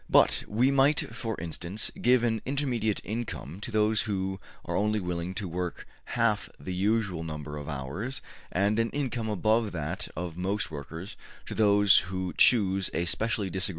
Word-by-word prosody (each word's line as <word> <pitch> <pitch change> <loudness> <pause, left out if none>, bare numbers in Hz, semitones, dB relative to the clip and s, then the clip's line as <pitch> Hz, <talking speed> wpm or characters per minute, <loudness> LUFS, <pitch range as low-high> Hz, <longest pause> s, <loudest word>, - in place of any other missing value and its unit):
But - - +5
we 120 +6 +3
might, 140 -3 +3
for 115 -1 -4
instance, 85 +5 -3
give 125 0 +5
an 115 -2 +1
intermediate 125 -6 0
income 105 - -5
to 105 - -5
those 110 -1 +3
who 95 -2 -2 0.3
are - - -2
only 105 +1 +2
willing 90 0 -3
to 100 -1 -3
work 90 +1 -4 0.3
half 110 -3 +2
the 95 - -5
usual 100 -2 +1
number 75 -2 -5
of 75 0 -6
hours, 80 - -3 0.3
and 100 +4 +2
an 115 0 +2
income 125 -6 -2
above 110 +1 +2
that 85 +5 -3
of 90 -2 -4
most 95 -1 -1
workers 80 +6 -7 0.3
to - - -6
those 105 -2 +6
who 95 -1 -3
choose 95 -5 +4
a 85 +2 +1
specially 105 +1 -1
disagreeable 95 - -2
trade. - - +2
100 Hz, 170 wpm, -29 LUFS, 90-110 Hz, 0.3 s, those